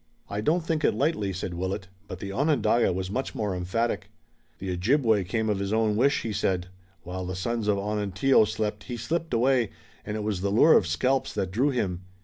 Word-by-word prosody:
"I 100 +1 -2
don't 160 +10 +2
think 160 -2 -1
it - - +3
likely," 135 -9 0
said 95 -1 -4
Willet, 95 +2 -3 0.2
but 95 - -6
the 100 +2 -6
Onondaga 130 -3 +2
was 95 +1 -3
much 130 +5 -3
more 105 -4 -1
emphatic. 95 +7 -1 0.5
"The 95 -1 -4
Ojibway 110 +3 +2
came 110 +4 -1
of 105 -2 0
his 100 0 -2
own 110 -1 +2
wish," 135 +6 +2
he 110 - -3
said. 90 -2 -1 0.3
"While 90 +1 -5
the 95 - -3
sons 115 +3 -2
of 105 -1 +3
Onontio 105 +4 +2
slept 105 -1 -3
he 120 - -5
slipped 165 +7 -2
away, 125 -1 +2 0.3
and 105 - -4
it 105 - -3
was 105 -4 -2
the 100 - 0
lure 120 +10 +6
of 90 - +4
scalps 130 +10 0
that 95 - -1
drew 125 +9 +2
him. 95 -9 -1
105 Hz, 205 wpm, -27 LUFS, 95-125 Hz, 0.5 s, lure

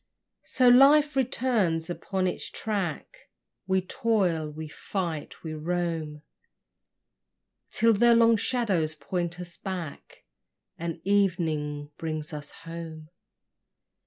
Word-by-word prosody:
So 255 - +3
life 285 +4 +7
returns 230 -11 +1
upon 185 +2 -2
its 180 - -3
track: 195 -8 -4 0.4
We 190 0 +2
toil, 185 - 0
we 155 +1 -7
fight, 165 -1 -5
we 160 -1 -5
roam, 160 -2 -3 1.5
Till 230 0 +4
the 235 +3 +5
long 230 0 +6
shadows 200 -9 0
point 175 +1 -3
us 175 -1 -8
back, 180 -6 -7 0.6
And 170 0 -4
evening 160 -7 0
brings 155 -1 -4
us 150 -1 -5
home. 165 -2 -9
175 Hz, 100 wpm, -27 LUFS, 155-210 Hz, 1.5 s, life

